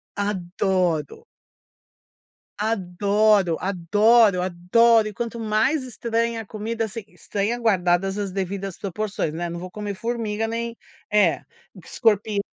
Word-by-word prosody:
Adoro. 185 -5 -1 1.3
Adoro, 200 -2 +2
adoro, 200 +2 +4
adoro. 215 +6 +3
E, 210 - -6
quanto 235 +1 -4
mais 225 +7 +1
estranha 230 -1 -2
a - - -10
comida, 225 +2 -3
assim, 220 0 -7
estranha 210 +4 -3
guardadas 195 -3 +1
as 200 -2 -3
devidas 195 0 -4
proporções, 200 -4 -3
né. 170 +2 -3
Não 170 0 -5
vou 185 +1 -7
comer 205 +1 -5
formiga 225 0 -2
nem 230 +1 -3 0.4
É, 210 0 +3 0.4
escorpi, 210 -2 +1
210 Hz, 115 wpm, -23 LUFS, 185-225 Hz, 1.3 s, adoro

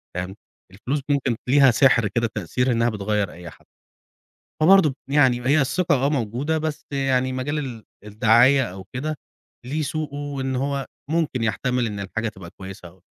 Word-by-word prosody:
تمام، 90 +2 -4 0.4
الفلوس 125 +9 -3
ممكن 135 -4 +1
ليها 135 -1 +6
سحر 120 -2 +4
كده 115 +3 -1
تأثير 125 +6 0
إنها 115 0 +2
بتغير 105 -2 -1
أي 85 -1 -10
حد. - - -19 1.0
فبرضه 160 -5 +5
يعني 130 -4 +3
هي 145 +2 +4
الثقة 170 +6 +1
آه - - +3
موجودة، 135 +3 -1
بس 155 -1 -4
يعني 130 -2 0
مجال 140 +4 -2
ال 125 -6 -6 0.2
الدعاية 115 +5 +4
أو 95 -2 -8
كده 155 +5 -3 0.5
ليه 150 +5 -2
سوقه، 150 -1 -3
وإن 140 -2 -3
هو 140 +1 -2 0.2
ممكن 155 -7 0
يحتمل 125 +3 0
إن 105 -1 -5
الحاجة 110 +3 -3
تبقى 95 -5 -11
كويسة 95 -2 -9
أو 90 +2 -19
130 Hz, 160 wpm, -23 LUFS, 110-145 Hz, 1.0 s, ليها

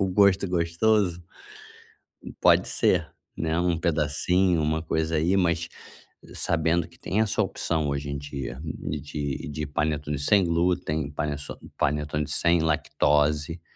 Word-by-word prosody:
o 95 - +1
gosto 100 -1 +4
gostoso, 90 +1 +1 1.2
pode - - +5
ser, - - +1 0.3
né, 80 0 -1
um 90 -2 +1
pedacinho, 85 +2 +1
uma 80 +1 0
coisa 80 0 -1
aí, 85 +5 +2
mas 85 -2 +1 0.7
sabendo 85 0 +1
que 85 - -21
tem 105 +4 0
essa 105 - +1
opção 80 -3 -1
hoje 70 0 -3
em 70 - -3
dia, 70 -2 -6
hum, 75 - -6
de 75 -2 -4
de 75 +1 -4
panetone 75 -1 -2
sem 95 +7 +4
glúten, 85 -4 0
paneço 75 0 -4 0.2
panetone 75 +1 -1
sem 85 0 +2
lactose, 75 +1 +1
80 Hz, 130 wpm, -26 LUFS, 75-85 Hz, 1.2 s, pode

